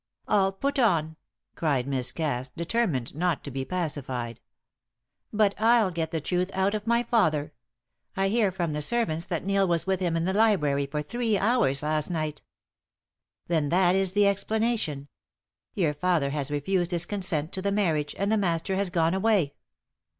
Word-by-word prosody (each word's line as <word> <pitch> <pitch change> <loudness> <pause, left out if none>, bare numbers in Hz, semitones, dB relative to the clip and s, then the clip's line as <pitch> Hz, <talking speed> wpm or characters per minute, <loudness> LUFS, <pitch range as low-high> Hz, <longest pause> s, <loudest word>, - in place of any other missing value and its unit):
"All 195 -2 +3
put 275 +8 -2
on!" 160 -9 +2 0.4
cried 140 -6 0
Miss 130 -3 0
Cass, 135 -5 -2
determined 170 - -1
not 170 +1 -1
to 140 - -7
be 135 +1 -3
pacified. 135 -9 -4 0.9
"But 210 -2 +2
I'll 225 -3 +4
get 165 -2 -2
the 165 - -2
truth 180 +4 -1
out 190 +2 +1
of 215 +1 -4
my 235 +1 +3
father. 160 -11 +1 0.6
I 195 0 +2
hear 215 -2 +2
from 175 -4 -2
the 150 - -2
servants 170 -3 0
that 170 0 -3
Neil 195 0 +2
was 170 -2 0
with 190 -1 0
him 175 -3 0
in 165 - -1
the 190 - 0
library 155 -10 +2
for 150 +1 -3
three 230 +4 -1
hours 200 - +2
last 155 +1 0
night." 155 -3 -3 1.0
"Then 160 -4 0
that 180 +2 +3
is 190 -1 +2
the 205 0 +4
explanation. 200 -7 0 0.7
Your 170 -8 +1
father 155 -3 0
has 145 -1 -2
refused 175 +5 0
his 175 -2 0
consent 175 -5 -2
to 190 - -3
the 200 +1 0
marriage, 160 -8 0
and 200 +2 0
the 220 - +3
Master 180 -1 0
has 200 -1 0
gone 165 -1 +1
away." 190 -7 +2
175 Hz, 170 wpm, -27 LUFS, 150-200 Hz, 1.0 s, I'll